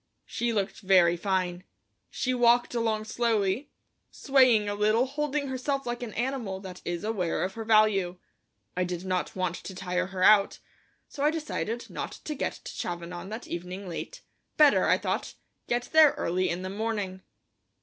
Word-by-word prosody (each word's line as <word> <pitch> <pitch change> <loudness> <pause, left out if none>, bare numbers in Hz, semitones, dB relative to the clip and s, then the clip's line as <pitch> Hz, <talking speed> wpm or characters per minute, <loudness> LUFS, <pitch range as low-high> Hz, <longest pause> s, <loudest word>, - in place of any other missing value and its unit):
She 240 0 -2
looked 205 -3 -2
very 185 -4 +4
fine; 185 -1 -1 0.5
she 255 - -1
walked 240 0 +3
along 225 -2 0
slowly, 220 +2 0 0.4
swaying 255 -6 +4
a 205 - -1
little, 215 +4 +2
holding 290 +1 -2
herself 270 +1 -2
like 240 0 -3
an 235 -3 -6
animal 240 -6 -2
that 185 -2 -9
is 175 +1 -3
aware 200 -6 -1
of 190 +1 -2
her 225 - -5
value. 215 -5 +3 0.6
I 180 - +1
did 180 0 -4
not 185 -1 -2
want 185 -2 -1
to 190 - -9
tire 180 0 -2
her 185 -1 -3
out, 200 0 +5 0.5
so 280 - -8
I 295 - +4
decided 300 -7 -3
not - - -5
to 305 - -3
get 290 - -3
to - - -6
Chavanon 175 +1 -5
that 220 +3 -6
evening 180 +3 -6
late; - - -7 0.3
better, 300 -2 +6
I - - +4
thought, - - -3 0.3
get 240 0 -1
there 315 -2 +7
early 185 +2 -1
in 175 +2 -3
the 185 - -4
morning. 205 -3 -3
210 Hz, 170 wpm, -28 LUFS, 185-245 Hz, 0.6 s, there